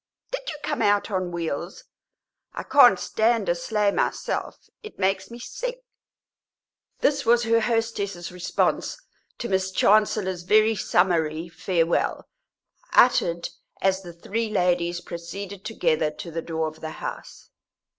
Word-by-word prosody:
Did -, -, -4 dB
you 305 Hz, -, -5 dB
come -, -, -2 dB
out 205 Hz, +1 st, +2 dB
on 185 Hz, -2 st, -1 dB
wheels? 170 Hz, +1 st, -4 dB, 0.7 s
I -, -, -4 dB
can't -, -, +6 dB
stand 225 Hz, -1 st, +1 dB
a -, -, +3 dB
sleigh 205 Hz, +4 st, 0 dB
myself; -, -, -2 dB, 0.2 s
it 430 Hz, -, -11 dB
makes 190 Hz, 0 st, 0 dB
me 235 Hz, -, -9 dB
sick." -, -, -6 dB, 1.2 s
This 290 Hz, -, +2 dB
was 235 Hz, +1 st, +4 dB
her 230 Hz, 0 st, +3 dB
hostess's 220 Hz, -6 st, -2 dB
response 180 Hz, -, -1 dB, 0.4 s
to 240 Hz, -, -4 dB
Miss 190 Hz, -2 st, 0 dB
Chancellor's 195 Hz, -2 st, +2 dB
very 215 Hz, +4 st, +4 dB
summary 170 Hz, -4 st, +1 dB
farewell, 170 Hz, -1 st, 0 dB, 0.7 s
uttered 170 Hz, -8 st, +4 dB, 0.3 s
as 190 Hz, 0 st, +1 dB
the 175 Hz, -2 st, -9 dB
three 220 Hz, +6 st, -3 dB
ladies 175 Hz, -3 st, +1 dB
proceeded 185 Hz, +4 st, -7 dB
together 160 Hz, -9 st, +1 dB
to 170 Hz, +2 st, -9 dB
the 165 Hz, +1 st, -3 dB
door 160 Hz, -1 st, -2 dB
of 155 Hz, 0 st, -9 dB
the 160 Hz, 0 st, -5 dB
house. -, -, -8 dB
190 Hz, 135 wpm, -25 LUFS, 170-220 Hz, 1.2 s, can't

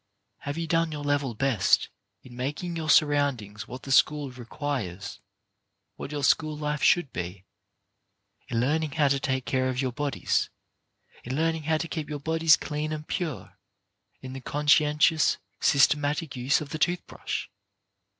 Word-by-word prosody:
Have 145 Hz, +2 st, -5 dB
you 165 Hz, -, -2 dB
done 165 Hz, 0 st, +1 dB
your 150 Hz, -1 st, -5 dB
level 145 Hz, -4 st, 0 dB
best 105 Hz, -6 st, +2 dB, 0.3 s
in 125 Hz, -2 st, -13 dB
making 150 Hz, +7 st, -3 dB
your 160 Hz, -1 st, -3 dB
surroundings 135 Hz, -10 st, +2 dB
what 125 Hz, +1 st, -8 dB
the 135 Hz, -, -6 dB
school 145 Hz, 0 st, +3 dB
requires, 120 Hz, -6 st, -5 dB, 0.8 s
what -, -, -7 dB
your 145 Hz, -1 st, -3 dB
school 155 Hz, +2 st, +2 dB
life 150 Hz, 0 st, -2 dB
should 175 Hz, -6 st, +3 dB
be, 90 Hz, +2 st, -5 dB, 1.0 s
in 115 Hz, -, -1 dB
learning 150 Hz, +4 st, 0 dB
how 145 Hz, -1 st, +3 dB
to 140 Hz, 0 st, +2 dB
take 130 Hz, -2 st, -1 dB
care 130 Hz, -1 st, 0 dB
of 125 Hz, -1 st, -2 dB
your 130 Hz, -2 st, 0 dB
bodies, 145 Hz, +2 st, -1 dB, 0.7 s
in 130 Hz, +2 st, -4 dB
learning 160 Hz, 0 st, 0 dB
how 160 Hz, -, +3 dB
to 165 Hz, -, -3 dB
keep 160 Hz, -2 st, -5 dB
your 150 Hz, -1 st, -4 dB
bodies 160 Hz, +3 st, +4 dB
clean 150 Hz, -2 st, -3 dB
and 155 Hz, 0 st, -5 dB
pure, 170 Hz, -7 st, -4 dB, 0.6 s
in 130 Hz, 0 st, -8 dB
the 135 Hz, -, -7 dB
conscientious, 150 Hz, +2 st, +3 dB, 0.2 s
sys 140 Hz, -, +5 dB
tematic 145 Hz, 0 st, -3 dB
use 130 Hz, +4 st, +1 dB
of 150 Hz, -, -6 dB
the 155 Hz, -, -5 dB
tooth 175 Hz, +2 st, +1 dB
brush -, -, -5 dB
145 Hz, 160 wpm, -27 LUFS, 130-155 Hz, 1.0 s, sys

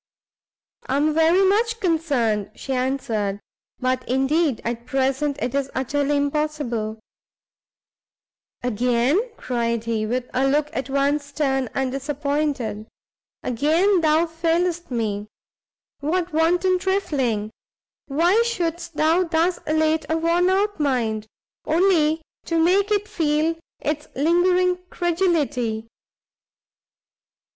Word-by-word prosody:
"I 265 Hz, -, 0 dB
am 300 Hz, +2 st, +2 dB
very 325 Hz, +4 st, +4 dB
much 455 Hz, +3 st, +1 dB
concerned," 280 Hz, -, 0 dB
she 270 Hz, -, -4 dB
answered, 230 Hz, -6 st, -1 dB, 0.4 s
"but 255 Hz, 0 st, -1 dB
indeed 270 Hz, +1 st, +1 dB
at 235 Hz, +1 st, -4 dB
present 270 Hz, +1 st, 0 dB
it 250 Hz, -, -2 dB
is 275 Hz, -1 st, -1 dB
utterly 285 Hz, +2 st, 0 dB
impossible." 285 Hz, -7 st, -2 dB, 1.6 s
"Again," 245 Hz, -, +2 dB, 0.2 s
cried 235 Hz, -2 st, -1 dB
he, 225 Hz, -2 st, -1 dB
with 250 Hz, +2 st, -2 dB
a 265 Hz, +2 st, +2 dB
look 295 Hz, +2 st, +1 dB
at 265 Hz, -3 st, -3 dB
once 280 Hz, +2 st, +1 dB
stern 270 Hz, -3 st, -1 dB
and 265 Hz, -1 st, 0 dB
disappointed, 275 Hz, -5 st, -2 dB, 0.6 s
"again 325 Hz, -, +2 dB
thou 315 Hz, +1 st, +3 dB
failest 340 Hz, +1 st, -1 dB
me? 215 Hz, -4 st, -2 dB, 0.7 s
what 335 Hz, +4 st, -1 dB
wanton 355 Hz, +3 st, +2 dB
trifling! 270 Hz, -, -1 dB, 0.6 s
why 345 Hz, +10 st, +3 dB
shouldst 345 Hz, -7 st, -3 dB
thou 320 Hz, +4 st, +3 dB
thus 335 Hz, +1 st, +1 dB
elate 315 Hz, 0 st, +1 dB
a 320 Hz, -, +1 dB
worn 340 Hz, +2 st, +2 dB
out 400 Hz, 0 st, +1 dB
mind, 230 Hz, -7 st, 0 dB, 0.4 s
only 320 Hz, -2 st, +2 dB, 0.2 s
to 335 Hz, -, -1 dB
make 375 Hz, +5 st, +3 dB
it 415 Hz, 0 st, +1 dB
feel 320 Hz, -5 st, +1 dB, 0.3 s
its 300 Hz, 0 st, -3 dB
lingering 360 Hz, +4 st, +3 dB
credulity? 295 Hz, -11 st, 0 dB
295 Hz, 110 wpm, -23 LUFS, 255-340 Hz, 1.6 s, very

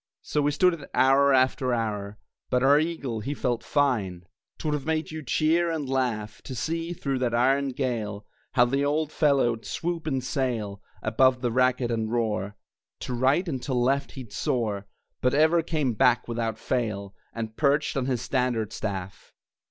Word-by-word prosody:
So 150 Hz, -, 0 dB
we 145 Hz, -, +2 dB
stood 180 Hz, +5 st, +3 dB
it 150 Hz, -4 st, -8 dB
hour 135 Hz, +2 st, +5 dB
after 130 Hz, -1 st, +2 dB
hour; 105 Hz, -3 st, -3 dB, 0.3 s
But 125 Hz, 0 st, +2 dB
our 140 Hz, +2 st, +6 dB
eagle, 155 Hz, -8 st, -2 dB
he 140 Hz, +7 st, -4 dB
felt 125 Hz, -3 st, -1 dB
fine! 105 Hz, -, 0 dB, 0.3 s
'Twould 150 Hz, -, -2 dB
have 145 Hz, -2 st, -2 dB
made 160 Hz, 0 st, -1 dB
you 160 Hz, 0 st, -5 dB
cheer 160 Hz, +5 st, +2 dB
and 155 Hz, -4 st, -2 dB
laugh, 120 Hz, -5 st, -2 dB
To 130 Hz, -, -6 dB
see, 165 Hz, +7 st, -2 dB
through 140 Hz, -6 st, -2 dB
that 120 Hz, -2 st, 0 dB
iron 135 Hz, +3 st, +3 dB
gale, 110 Hz, -6 st, -3 dB, 0.3 s
How 120 Hz, -2 st, +5 dB
the 135 Hz, +3 st, 0 dB
old 150 Hz, +1 st, 0 dB
fellow'd 135 Hz, -8 st, +2 dB
swoop 170 Hz, -1 st, -3 dB
and 135 Hz, -4 st, -1 dB
sail 115 Hz, -7 st, -2 dB, 0.2 s
Above 125 Hz, +3 st, +3 dB
the 120 Hz, -2 st, 0 dB
racket 125 Hz, 0 st, +2 dB
and 110 Hz, -1 st, -1 dB
roar, 105 Hz, -4 st, -1 dB, 0.5 s
To 125 Hz, -, -4 dB
right 135 Hz, +9 st, +2 dB
and 135 Hz, -6 st, -3 dB
to 130 Hz, -1 st, -2 dB
left 135 Hz, +3 st, +1 dB
he'd 125 Hz, -6 st, -9 dB
soar, 105 Hz, -5 st, -1 dB, 0.3 s
But 125 Hz, +1 st, +2 dB
ever 160 Hz, +3 st, +4 dB
came 155 Hz, -6 st, -1 dB
back, 125 Hz, +2 st, +3 dB
without 115 Hz, -2 st, -2 dB
fail, 105 Hz, -6 st, -2 dB, 0.2 s
And 110 Hz, -1 st, -5 dB
perched 145 Hz, +2 st, +2 dB
on 135 Hz, -2 st, -1 dB
his 125 Hz, -3 st, -1 dB
standard 125 Hz, -5 st, 0 dB
staff. 95 Hz, -3 st, -5 dB
130 Hz, 175 wpm, -26 LUFS, 115-145 Hz, 0.5 s, our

